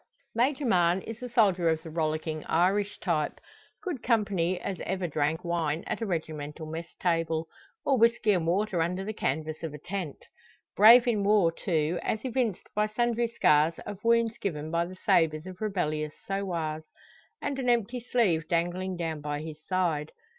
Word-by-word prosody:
Major 265 Hz, +5 st, +1 dB
Mahon 180 Hz, -4 st, +3 dB
is 225 Hz, +1 st, -8 dB
a 250 Hz, -, -5 dB
soldier 195 Hz, -8 st, +3 dB
of 160 Hz, -1 st, 0 dB
the 160 Hz, -, -8 dB
rollicking 155 Hz, -1 st, -2 dB
Irish 195 Hz, +4 st, +1 dB
type 155 Hz, -5 st, -1 dB, 0.4 s
good 345 Hz, -, -3 dB
company 200 Hz, -7 st, +1 dB
as 190 Hz, 0 st, -4 dB
ever 190 Hz, 0 st, -2 dB
drank 155 Hz, +1 st, -1 dB
wine 165 Hz, -2 st, -1 dB
at -, -, -3 dB
a 225 Hz, -, -1 dB
regimental 155 Hz, -3 st, -4 dB
mess 165 Hz, +2 st, -6 dB
table, 165 Hz, -2 st, 0 dB, 0.4 s
or 275 Hz, -4 st, +3 dB
whisky 230 Hz, -1 st, +4 dB
and 175 Hz, -4 st, +1 dB
water 190 Hz, 0 st, +1 dB
under 180 Hz, +3 st, -1 dB
the 215 Hz, -, -3 dB
canvas 155 Hz, -3 st, -2 dB
of 160 Hz, -2 st, -5 dB
a -, -, -6 dB
tent. 175 Hz, -1 st, -5 dB, 0.5 s
Brave 230 Hz, +4 st, +9 dB
in 215 Hz, -4 st, +2 dB
war, 200 Hz, -4 st, +4 dB
too, 165 Hz, -1 st, -1 dB
as 215 Hz, +3 st, -2 dB
evinced 245 Hz, -6 st, -1 dB
by 210 Hz, 0 st, +2 dB
sundry 235 Hz, +2 st, 0 dB
scars 160 Hz, -8 st, +3 dB
of 205 Hz, -1 st, -7 dB
wounds 230 Hz, -1 st, +3 dB
given 155 Hz, -5 st, -3 dB
by 170 Hz, 0 st, +1 dB
the 185 Hz, -, -9 dB
sabres 155 Hz, -1 st, +3 dB
of 185 Hz, +1 st, -9 dB
rebellious 155 Hz, -8 st, -1 dB
sowars, 170 Hz, -6 st, -2 dB, 0.6 s
and 280 Hz, -2 st, -3 dB
an 250 Hz, -2 st, 0 dB
empty 240 Hz, +1 st, +1 dB
sleeve 210 Hz, -10 st, +1 dB
dangling 175 Hz, +2 st, -1 dB
down 160 Hz, -3 st, -3 dB
by 145 Hz, 0 st, -3 dB
his 155 Hz, -1 st, -8 dB
side. 170 Hz, -5 st, 0 dB
180 Hz, 170 wpm, -28 LUFS, 160-215 Hz, 0.6 s, Brave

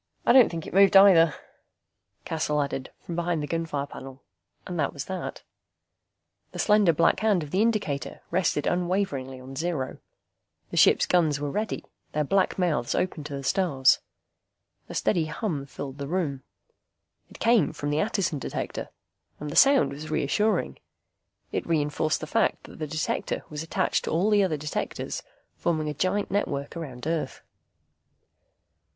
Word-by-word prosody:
"I -, -, +5 dB
don't 255 Hz, -2 st, +7 dB
think 165 Hz, -2 st, -5 dB
it -, -, -8 dB
moved 195 Hz, 0 st, +7 dB
either," 170 Hz, -6 st, +7 dB, 0.9 s
Cassel 155 Hz, -2 st, -1 dB
added, 140 Hz, -2 st, -2 dB
from 170 Hz, -, -5 dB
behind 170 Hz, -2 st, -1 dB
the -, -, -3 dB
gunfire 165 Hz, -4 st, -2 dB
panel. 135 Hz, -1 st, -11 dB, 0.4 s
And 175 Hz, -2 st, -5 dB
that 145 Hz, -, 0 dB
was 140 Hz, -1 st, -5 dB
that. 190 Hz, -1 st, -5 dB, 1.1 s
The -, -, -7 dB
slender 210 Hz, -4 st, +4 dB
black 165 Hz, +1 st, +3 dB
hand 210 Hz, -6 st, +2 dB
of 145 Hz, -, -9 dB
the 190 Hz, -, +2 dB
indicator 205 Hz, -, -1 dB
rested 170 Hz, -5 st, +1 dB
unwaveringly 175 Hz, -8 st, -1 dB
on 130 Hz, +1 st, -10 dB
zero. 155 Hz, -4 st, -3 dB, 0.7 s
The -, -, -4 dB
ship's -, -, +5 dB
guns 160 Hz, -5 st, +2 dB
were 145 Hz, -1 st, -3 dB
ready, 215 Hz, +5 st, -3 dB, 0.3 s
their 150 Hz, -, +1 dB
black 190 Hz, +6 st, +1 dB
mouths 155 Hz, -10 st, 0 dB
open 180 Hz, -4 st, -1 dB
to 145 Hz, -1 st, -5 dB
the 140 Hz, -, -6 dB
stars. 140 Hz, -6 st, +3 dB, 0.9 s
A -, -, -7 dB
steady 170 Hz, -6 st, +1 dB
hum 150 Hz, -4 st, -3 dB
filled 140 Hz, 0 st, -7 dB
the 140 Hz, -, -4 dB
room. 155 Hz, -5 st, -2 dB, 0.9 s
It -, -, -13 dB
came 230 Hz, -9 st, +3 dB
from 145 Hz, 0 st, -4 dB
the 150 Hz, -, +1 dB
Attison 185 Hz, -5 st, 0 dB
Detector, -, -, -4 dB, 0.5 s
and 150 Hz, -1 st, -5 dB
the -, -, -6 dB
sound 275 Hz, -1 st, +6 dB
was 150 Hz, +3 st, -7 dB
reassuring. 210 Hz, +9 st, 0 dB, 0.7 s
It -, -, -3 dB
reinforced 155 Hz, -1 st, 0 dB
the -, -, -3 dB
fact -, -, +1 dB
that -, -, -13 dB
the 155 Hz, -, -3 dB
Detector 155 Hz, +2 st, -2 dB
was 150 Hz, 0 st, -4 dB
attached 160 Hz, -, 0 dB
to -, -, -2 dB
all 185 Hz, +7 st, +1 dB
the 205 Hz, -1 st, +5 dB
other 165 Hz, -5 st, 0 dB
Detectors, 150 Hz, +1 st, -4 dB, 0.4 s
forming 155 Hz, -3 st, 0 dB
a -, -, -3 dB
gigantic 185 Hz, +7 st, -1 dB
network 145 Hz, -8 st, -2 dB
around 135 Hz, -7 st, -7 dB
Earth. 160 Hz, 0 st, -2 dB
160 Hz, 160 wpm, -26 LUFS, 145-185 Hz, 1.1 s, don't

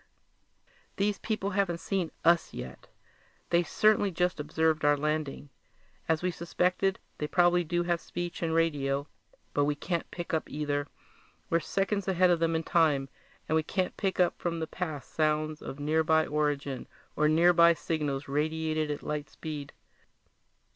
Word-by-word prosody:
"These 205 Hz, +1 st, 0 dB
people 215 Hz, -3 st, -2 dB
haven't 190 Hz, -3 st, +1 dB
seen 180 Hz, 0 st, -2 dB, 0.2 s
us 170 Hz, 0 st, +3 dB
yet. 65 Hz, 0 st, -8 dB, 0.6 s
They 170 Hz, 0 st, +5 dB
certainly 205 Hz, +4 st, +3 dB
just 180 Hz, -1 st, 0 dB
observed 160 Hz, +1 st, +1 dB
our 145 Hz, 0 st, +4 dB
landing. 150 Hz, -1 st, -2 dB, 0.6 s
As 160 Hz, +1 st, +1 dB
we 180 Hz, -, +1 dB
suspected, 180 Hz, +3 st, 0 dB, 0.2 s
they 150 Hz, -, -1 dB
probably 175 Hz, +1 st, +3 dB
do 175 Hz, +1 st, 0 dB
have 175 Hz, -1 st, 0 dB
speech 175 Hz, 0 st, -5 dB
and 165 Hz, -1 st, 0 dB
radio 145 Hz, -4 st, +1 dB, 0.5 s
but 145 Hz, -, +2 dB
we 145 Hz, 0 st, 0 dB
can't 170 Hz, +3 st, -3 dB
pick 175 Hz, -2 st, -6 dB
up 160 Hz, -, -1 dB
either. 145 Hz, -1 st, -2 dB, 0.6 s
We're 165 Hz, -, +4 dB
seconds 195 Hz, +3 st, -1 dB
ahead 185 Hz, -1 st, +4 dB
of 170 Hz, -, +3 dB
them 165 Hz, 0 st, +1 dB
in 160 Hz, -, 0 dB
time 150 Hz, -5 st, +2 dB, 0.4 s
and 160 Hz, -, +1 dB
we 160 Hz, -, +4 dB
can't 185 Hz, +3 st, -2 dB
pick 195 Hz, -2 st, -2 dB
up 180 Hz, -1 st, +2 dB
from 170 Hz, -1 st, -2 dB
the 160 Hz, -, -1 dB
past 155 Hz, -4 st, -5 dB
sounds 155 Hz, 0 st, 0 dB
of 135 Hz, -, -7 dB
nearby 160 Hz, +2 st, +2 dB
origin 145 Hz, -3 st, -1 dB, 0.3 s
or 150 Hz, -, +3 dB
nearby 170 Hz, +1 st, +6 dB
signals 150 Hz, -4 st, -2 dB
radiated 155 Hz, +2 st, -1 dB
at 145 Hz, -, -4 dB
light 150 Hz, -2 st, -3 dB
speed. 150 Hz, -3 st, -6 dB
160 Hz, 155 wpm, -29 LUFS, 150-175 Hz, 0.6 s, nearby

